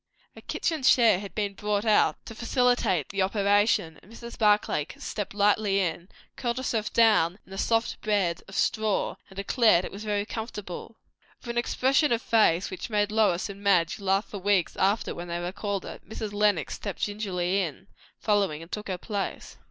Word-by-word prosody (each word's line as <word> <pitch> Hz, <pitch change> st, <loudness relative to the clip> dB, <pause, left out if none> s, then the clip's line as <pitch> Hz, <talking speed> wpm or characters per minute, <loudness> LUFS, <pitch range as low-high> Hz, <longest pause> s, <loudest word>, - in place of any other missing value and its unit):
A -, -, -12 dB
kitchen 320 Hz, -4 st, -2 dB
chair 235 Hz, -6 st, +5 dB
had 200 Hz, -1 st, -9 dB
been 205 Hz, -2 st, -1 dB
brought 210 Hz, +1 st, -1 dB
out 215 Hz, -1 st, +4 dB
to -, -, -8 dB
facilitate 240 Hz, -, +1 dB
the 200 Hz, -1 st, -1 dB
operation; 200 Hz, -5 st, +2 dB
and 205 Hz, -, -19 dB
Mrs. 235 Hz, +1 st, -9 dB
Barclay 210 Hz, -8 st, +2 dB
stepped 205 Hz, -2 st, -5 dB
lightly 205 Hz, -1 st, +2 dB
in, 175 Hz, 0 st, -2 dB, 0.3 s
curled 240 Hz, -1 st, -2 dB
herself 230 Hz, -5 st, -2 dB
down 210 Hz, -6 st, +4 dB
in -, -, -20 dB
the 195 Hz, -, -7 dB
soft 225 Hz, +1 st, 0 dB
bed 195 Hz, -6 st, 0 dB
of 195 Hz, -, -10 dB
straw, 215 Hz, 0 st, 0 dB
and 190 Hz, -, -16 dB
declared 200 Hz, -2 st, +3 dB
that -, -, -5 dB
it -, -, -22 dB
was 200 Hz, +2 st, -8 dB
very 205 Hz, -1 st, -1 dB
comfortable. 220 Hz, -2 st, -7 dB, 0.4 s
With 240 Hz, -, -10 dB
an 235 Hz, -, -6 dB
expression 270 Hz, +4 st, +2 dB
of 235 Hz, -1 st, +1 dB
face 205 Hz, -6 st, +3 dB
which 185 Hz, -, -6 dB
made 210 Hz, -1 st, +1 dB
Lois 210 Hz, -5 st, +2 dB
and 200 Hz, 0 st, -9 dB
Madge 180 Hz, -4 st, +2 dB
laugh 195 Hz, +1 st, +1 dB
for 200 Hz, -, -7 dB
weeks 195 Hz, -2 st, +1 dB
after 200 Hz, +3 st, +1 dB
when 175 Hz, +1 st, -7 dB
they 170 Hz, 0 st, -3 dB
recalled 195 Hz, +3 st, -3 dB
it, -, -, -10 dB
Mrs. 215 Hz, -1 st, -5 dB
Lenox 205 Hz, -3 st, +1 dB
stepped 200 Hz, -3 st, -5 dB
gingerly 195 Hz, -3 st, -1 dB
in, 175 Hz, +1 st, -5 dB, 0.3 s
following, 200 Hz, -7 st, 0 dB
and 165 Hz, -, -15 dB
took 210 Hz, -1 st, -5 dB
her 185 Hz, -2 st, -2 dB
place. 200 Hz, +1 st, -5 dB
205 Hz, 185 wpm, -27 LUFS, 190-220 Hz, 0.4 s, chair